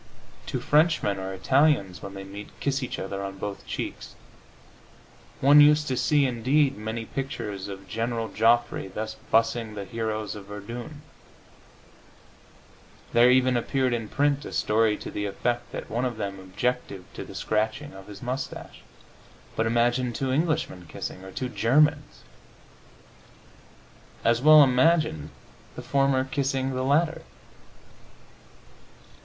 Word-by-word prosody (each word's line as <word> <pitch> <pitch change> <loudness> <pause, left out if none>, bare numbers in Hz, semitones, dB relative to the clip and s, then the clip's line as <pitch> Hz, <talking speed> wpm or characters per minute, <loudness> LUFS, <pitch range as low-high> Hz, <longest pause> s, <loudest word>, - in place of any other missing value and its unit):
Two - - -2
Frenchmen 150 - +2
or 95 0 -4
Italians, 100 - +2
when 100 0 -8
they 95 - -7
meet, 100 +2 -9
kiss 140 0 -1
each 130 - -4
other 100 +1 -4
on 95 0 -6
both 100 0 -6
cheeks. - - -5 1.3
One 145 +2 +8
used 150 +1 +5
to 130 - 0
see, 145 +2 +3
indeed, 130 +3 +2
many 110 +2 -5
pictures 105 -7 -5
of 100 -1 -9
General 115 0 -2
Joffre 115 -3 +2
thus 110 0 -5 0.2
bussing 115 -1 +1
the 100 -1 -5
heroes 110 -1 -3
of 105 -2 -9
Verdun; 120 +9 -8 2.1
there 120 +1 +6
even 130 0 +4
appeared 130 +1 0
in 115 -3 -3
print 145 0 +1
a - - -7
story 110 0 +2
to - - -8
the 105 0 -3
effect 120 +4 -2
that - - -6
one 120 +3 -2
of 120 -3 -3
them 100 -2 -4
objected 100 +1 -3
to - - -6
the - - -11
scratching 110 +7 -1
of 95 0 -12
his 105 +1 -10
moustache. 130 +2 -5 0.7
But 115 - +1
imagine 120 +2 +1
two 130 +2 -2
Englishmen 150 - -1
kissing! 90 +3 -7
Or 95 - -9
two 130 - -3
Germans! 140 +5 +2 2.0
As 115 +1 +3
well 155 +1 +9
imagined 130 - +2 0.5
the - - -7
former 135 -1 +2
kissing 135 0 -1
the 130 - -2
latter! 155 +5 +2
120 Hz, 135 wpm, -26 LUFS, 105-135 Hz, 2.1 s, well